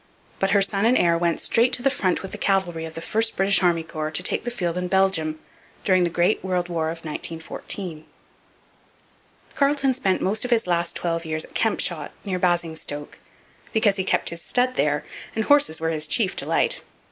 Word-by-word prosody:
But 195 - +1
her 200 -1 +4
son 195 +1 -1
and 250 - +4
heir 170 -1 +3
went 170 0 0
straight 235 +2 +3
to 245 - +2
the 275 - +3
front 185 -10 0
with 195 - -7
the - - -7
cavalry 175 -5 0
of 160 - -9
the 165 - -6
first 225 +4 +1
British 195 -1 +3
army 170 -3 +2
corps 155 -1 -4
to 155 +3 -1
take - - 0
the - - 0
field 175 -8 -2
in 180 0 -2
Belgium 180 -5 +1 0.5
during 185 -2 +3
the - - +1
Great 175 +5 +1
World 180 -2 -1
War 165 -2 -1
of 165 0 -7
1914. 165 +1 -5 1.5
Carleton 280 -1 +2
spent 200 -8 0
most 205 +3 -1
of 250 - -3
his 235 -2 +2
last 170 -1 0
twelve 165 -1 -2
years 155 -1 -1
at - - -19
Kempshot - - 0 0.2
near 185 -2 -2
Basingstoke 165 -4 -2 0.5
because 215 -3 +3
he 190 - 0
kept 185 - +1
his 170 0 -6
stud 250 +6 +1
there 150 - +1 0.3
and 220 - 0
horses 285 - +4
were 165 0 -1
his 155 -1 -1
chief 195 +4 +2
delight. - - +1
180 Hz, 195 wpm, -23 LUFS, 165-205 Hz, 1.5 s, her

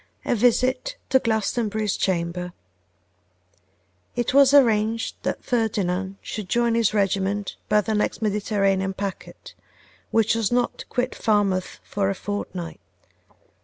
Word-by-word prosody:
A - - +1
Visit 255 - +2 0.2
to 265 - +6
Glastonbury's 220 -2 0
Chamber. 180 -1 -2 1.6
IT 240 +1 -1
WAS 275 -1 +7
arranged 225 -5 +3
that - - -3
Ferdinand 195 -5 -1
should 210 -4 -6
join 235 +1 +2
his 230 -2 +2
regiment 200 -1 0
by 210 0 +4
the 220 +2 -2
next 210 - 0
Mediterranean 195 -3 0
packet, 195 -1 -6 0.6
which 225 -1 +3
was 225 -2 0
not 245 0 0
to - - -7
quit 250 +1 -1
Falmouth 200 -4 0
for 200 -1 -1
a 195 - -1
fortnight. 185 -4 -5
210 Hz, 125 wpm, -24 LUFS, 195-230 Hz, 1.6 s, WAS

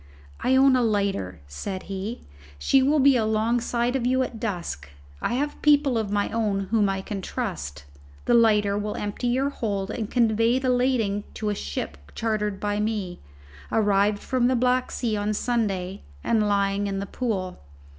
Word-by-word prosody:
"I 260 - +2
own 265 0 +6
a 255 - +3
lighter," 200 - -1
said 185 - -5
he: 195 +4 -5 0.3
"she 265 - +3
will 285 +4 +3
be 275 -1 +5
alongside 235 +2 +1
of 265 - 0
you 260 +1 +2
at 235 -3 -6
dusk. 170 - -4 0.3
I 240 - 0
have 290 +3 -2
people 290 -3 +4
of 220 -3 -1
my 205 0 0
own 215 -3 0
whom 210 -3 +3
I 195 0 -1
can 195 0 -5
trust. 125 - -5 0.4
The - - +2
lighter 210 -3 +4
will 210 0 -3
empty 210 +4 -3
your 265 +3 +1
hold 200 -5 -2
and 220 -2 -4
convey 230 0 +3
the 260 -1 +1
lading 245 -5 +1
to 215 - -2
a - - 0
ship 70 - -5 0.2
chartered 210 -3 -1
by 205 0 -1
me, 210 -4 -2 0.5
arrived 205 -1 +2
from 255 -2 +1
the 255 - +2
Black 250 +1 +2
Sea 230 -4 -1
on 210 +1 -1
Sunday 200 -6 -1 0.2
and 215 -2 +2
lying 200 0 +1
in 195 -1 -2
the 200 - -3
Pool. 195 -5 -3
215 Hz, 175 wpm, -25 LUFS, 200-245 Hz, 0.5 s, own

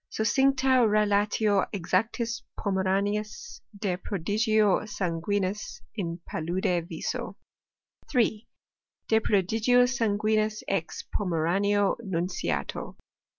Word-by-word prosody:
Succincta 260 +3 +3
relatio 205 0 +2
exactis 225 +6 -1 0.2
Pomeraniis 200 +2 -1 0.2
de 195 -4 -1
prodigio 210 +2 +1
sanguinis 195 +1 -2
in 175 -5 -4
palude 170 +1 -1
viso. - - -4 0.7
d 230 -4 +1 0.6
De 220 - +4
prodigio 225 +4 +3
sanguinis 215 -3 0
ex 165 -5 -2
Pomeranio 195 +3 +1
nunciato. 170 - -3
205 Hz, 75 wpm, -27 LUFS, 185-220 Hz, 0.7 s, De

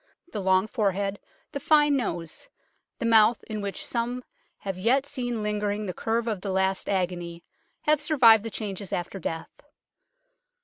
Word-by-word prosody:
The 205 - -3
long 190 0 +3
forehead, 200 -3 -1 0.3
the 285 - -4
fine 295 0 +4
nose, 175 - -4 0.5
the - - -3
mouth 225 0 +5
in 215 -1 -5
which 200 -1 -4
some 245 +1 -2 0.4
have 195 -2 -3
yet 240 +9 +2
seen 245 -5 -3
lingering 210 0 -1
the 185 - -3
curve 225 +4 -1
of 210 -5 -2
the 200 - -4
last 190 0 0
agony, 175 -3 -2 0.4
have 300 -1 +3
survived 240 -8 +6
the 225 - -4
changes 200 -3 -5
after 175 +2 -3
death. 165 -1 -6
210 Hz, 150 wpm, -26 LUFS, 190-235 Hz, 0.5 s, survived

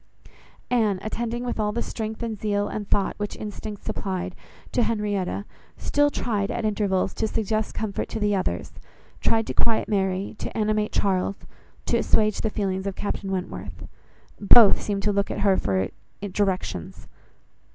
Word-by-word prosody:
Anne, 220 -5 +3
attending 235 +2 -2
with 245 -2 -3
all 210 -1 +1
the 235 +3 -1
strength 220 +1 -4
and 220 -3 -3
zeal, 205 -1 +1
and 205 -1 -4
thought, 200 - +2
which 205 0 -3
instinct 210 0 -6
supplied, 185 -4 -2 0.4
to 245 - +2
Henrietta, 205 -4 0 0.3
still 290 0 +3
tried, 210 -7 -1
at 235 - -2
intervals, 205 -3 +1
to 220 - 0
suggest 215 0 -1
comfort 215 -3 -2
to - - -3
the 205 -1 +2
others, 135 - -1 0.5
tried 225 -1 +2
to - - -3
quiet 230 -1 +2
Mary, 195 -1 0
to - - -4
animate 215 -1 +1
Charles, 195 0 0 0.4
to - - +2
assuage 215 -1 +2
the 220 - +1
feelings 195 -2 -1
of 195 - -3
Captain 200 -1 -3
Wentworth. 185 -1 -4 0.5
Both 210 +1 +8
seemed 200 -1 -2
to 210 - +2
look 200 0 +2
to - - -4
her 195 -2 +5
for 95 - +1 0.3
directions. 190 - -2
205 Hz, 160 wpm, -25 LUFS, 195-220 Hz, 0.5 s, Both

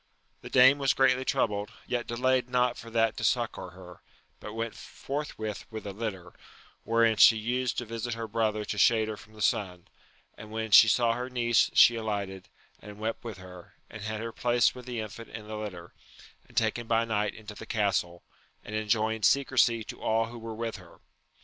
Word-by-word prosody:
The - - -9
dame 130 +3 +6
was 135 -1 +2
greatly 130 -1 +3
troubled, 105 -5 0 0.2
yet 120 -1 -3
delayed 125 +1 +1
not 125 -1 +1
for 115 - -10
that 115 -1 +1
to - - -5
succour - - -1
her, 90 -1 -13 0.4
but 105 - -8
went 115 0 -3
forthwith 135 -7 -6
with 110 -2 -8
a 100 - -5
litter, 95 -5 -6 0.5
wherein 115 -1 +2
she 115 - +7
used 125 +3 -1
to 120 - -2
visit 115 +1 -4
her 115 0 -5
brother 110 -1 -1
to 105 - -4
shade 110 -1 +4
her 110 - -4
from 110 +1 -16
the 105 -1 -5
sun; 90 -3 -1 0.5
and 110 - -11
when 110 0 -4
she 110 - +9
saw 115 +2 +3
her 125 +2 -4
niece 120 -2 +2
she 120 - +7
alighted, 100 -4 -4 0.3
and 105 -1 -11
wept 110 +1 -4
with 115 -5 -7
her, 90 -2 -13 0.2
and 110 - -9
had 110 0 -4
her 115 0 -4
placed 120 0 +2
with 125 0 -11
the 120 -2 -4
infant 110 +1 -7
in 110 -1 -9
the 110 - -6
litter, 95 -5 -7 0.5
and - - -21
taken 115 +1 0
by 115 0 +2
night 105 -2 -1
into 105 -1 -10
the 105 - -10
castle, 95 -5 -1 0.4
and 105 - -8
enjoined 110 0 0
secrecy 125 -4 +3
to - - -10
all 115 +1 +1
who 115 +1 -9
were 115 -1 -7
with 115 -1 -4
her. 90 -3 -16
110 Hz, 195 wpm, -28 LUFS, 105-120 Hz, 0.5 s, she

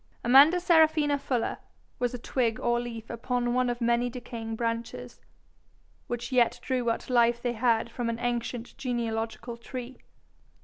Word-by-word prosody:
Amanda 280 +8 +7
Serafina 315 -4 +4
Fuller 250 -4 -2 0.4
was 245 -1 0
a - - -4
twig 235 -1 -1
or 240 0 +1
leaf 230 -2 -6
upon 240 +1 -1
one 250 0 +2
of 240 0 -3
many 235 +1 +2
decaying 235 -2 -6
branches, 230 0 -4 0.9
which 240 +2 -4
yet 245 -2 +3
drew 255 -2 -1
what 230 -1 -1
life 235 -1 +3
they 240 0 -2
had 230 0 +2
from 235 0 -3
an 230 - -2
ancient 240 0 -3
genealogical 235 -2 -3
tree. 250 +1 -8
240 Hz, 145 wpm, -28 LUFS, 230-250 Hz, 0.9 s, Amanda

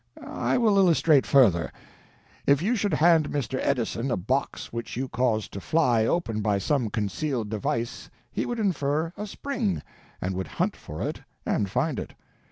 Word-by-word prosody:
I - - 0
will 215 -5 +4
illustrate 165 -6 +4
further. 100 - +4 0.8
If 140 -1 +5
you 230 +6 +2
should 200 -6 0
hand 160 -1 +4
Mr. 130 -2 -2
Edison 120 +1 0
a 120 - +1
box 125 +9 -2
which 115 0 -5
you 130 +1 -1
caused 120 -5 0
to 100 - -5
fly 120 - +2
open 115 -11 0
by 105 -1 +1
some 125 +2 0
concealed 110 +3 -2
device 115 +3 -2 0.2
he - - -2
would 240 - -2
infer 160 -5 0
a 210 - -5
spring, 235 -4 -2 0.4
and 95 +1 -2
would 95 -1 -3
hunt - - -1
for 75 - -7
it - - -5 0.2
and 100 - 0
find - - 0
it. - - -7
135 Hz, 170 wpm, -26 LUFS, 110-165 Hz, 0.8 s, If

